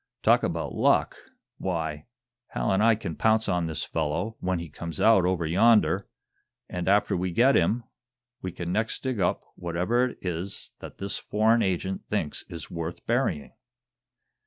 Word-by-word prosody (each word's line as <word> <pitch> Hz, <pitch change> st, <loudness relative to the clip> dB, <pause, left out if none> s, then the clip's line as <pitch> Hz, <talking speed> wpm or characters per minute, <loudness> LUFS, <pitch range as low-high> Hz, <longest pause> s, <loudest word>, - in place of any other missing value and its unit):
Talk -, -, +5 dB
about -, -, -2 dB
luck! -, -, +2 dB, 0.4 s
Why, 80 Hz, -5 st, -3 dB, 0.5 s
Hal -, -, 0 dB
and 95 Hz, +1 st, +2 dB
I 115 Hz, 0 st, +5 dB
can 90 Hz, -7 st, -5 dB
pounce 110 Hz, +3 st, +2 dB
on 90 Hz, -3 st, 0 dB
this 80 Hz, -, -3 dB
fellow, 80 Hz, +8 st, -2 dB
when 90 Hz, 0 st, -1 dB
he 85 Hz, 0 st, -5 dB
comes 80 Hz, +1 st, -7 dB
out 110 Hz, -5 st, +5 dB
over 90 Hz, -2 st, 0 dB
yonder, 105 Hz, +7 st, +4 dB, 0.6 s
and, 90 Hz, -1 st, -4 dB
after 100 Hz, +1 st, +3 dB
we 90 Hz, +1 st, -1 dB
get 125 Hz, +10 st, +4 dB
him, 110 Hz, +8 st, +2 dB, 0.6 s
we 90 Hz, -, -4 dB
can 85 Hz, 0 st, -5 dB
next 110 Hz, +4 st, -1 dB
dig 130 Hz, -5 st, -2 dB
up -, -, +1 dB
whatever 90 Hz, +9 st, 0 dB
it -, -, -12 dB
is 90 Hz, +2 st, -4 dB
that -, -, -10 dB
this 100 Hz, 0 st, -4 dB
foreign 110 Hz, +2 st, +2 dB
agent 95 Hz, 0 st, -1 dB
thinks 85 Hz, -8 st, -2 dB
is 85 Hz, -3 st, -8 dB
worth 85 Hz, 0 st, -5 dB
burying!" 115 Hz, -, 0 dB
90 Hz, 160 wpm, -27 LUFS, 85-110 Hz, 0.6 s, Talk